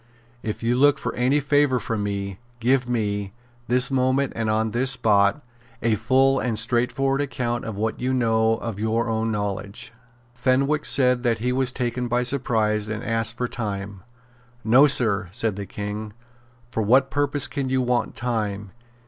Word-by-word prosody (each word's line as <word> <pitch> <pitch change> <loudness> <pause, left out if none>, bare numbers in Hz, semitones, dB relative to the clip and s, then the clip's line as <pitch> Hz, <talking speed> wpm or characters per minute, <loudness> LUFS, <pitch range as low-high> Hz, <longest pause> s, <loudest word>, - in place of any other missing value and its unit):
If 110 0 -5
you 120 +1 +1
look 145 +1 +5
for - - -4
any 130 +4 +2
favour 145 -2 +2
from 110 -1 -3
me, 100 -1 -4 0.2
give 125 +1 +1
me, 100 -4 -2 0.3
this 125 +2 +2
moment 130 +1 +1
and 115 -1 -1
on 110 0 0
this 125 +4 +1
spot, 105 0 +2 0.4
a 115 -1 +2
full 130 +5 +3
and 115 -3 -1
straightforward 125 +4 +1
account 125 -4 -3
of 110 -3 -5
what 110 +1 -2
you 125 +1 -1
know 115 -3 +2
of 115 -3 -6
your 110 +2 0
own 110 0 -1
knowledge." 100 0 -4 0.4
Fenwick 135 +4 +1
said 125 -2 +4
that 120 -2 +1
he 125 +3 -1
was 130 0 +1
taken 125 -1 -2
by 120 +1 +1
surprise, 110 -5 0
and 110 +1 -4
asked 115 +1 -1
for 125 - -1
time. 100 -4 -5 0.6
"No, 130 +6 +6
Sir," 110 -7 +2
said 110 0 -1
the 100 -1 -6
King. 105 +2 -6 0.6
"For 110 - -1
what 130 +6 +3
purpose 145 0 0
can 140 -3 -3
you 130 0 +1
want 125 0 -1
time? 105 -5 -3
120 Hz, 165 wpm, -23 LUFS, 110-130 Hz, 0.6 s, No